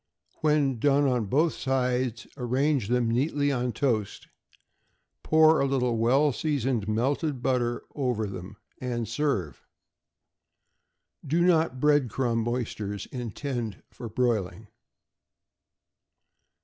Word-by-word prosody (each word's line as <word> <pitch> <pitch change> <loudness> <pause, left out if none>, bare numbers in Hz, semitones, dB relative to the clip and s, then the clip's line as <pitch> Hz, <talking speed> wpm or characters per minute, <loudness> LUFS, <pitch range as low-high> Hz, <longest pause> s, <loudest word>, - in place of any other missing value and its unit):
When 150 -5 +2
done 145 +2 +3
on 125 -4 +1
both 155 - +2
sides, 125 -3 -1
arrange 130 0 0
them 120 -1 +1
neatly 145 +3 +1
on 125 -2 -1
toast; 115 -6 -1 0.9
pour 160 0 +5
a 140 - +2
little 125 -3 +1
well 130 +6 +3
seasoned 130 -7 -1
melted 130 +5 -1
butter 120 -2 0
over 125 -6 -1
them, 95 +1 -8 0.2
and 120 -3 -3
serve. 115 - -2 1.6
Do 165 +5 +1
not 160 -6 +2
bread 145 -3 +3
crumb 115 -1 -1
oysters 110 -4 -3
intend 120 -2 -4
for 115 - -8
broiling. 110 -4 -1
125 Hz, 105 wpm, -27 LUFS, 115-140 Hz, 1.6 s, pour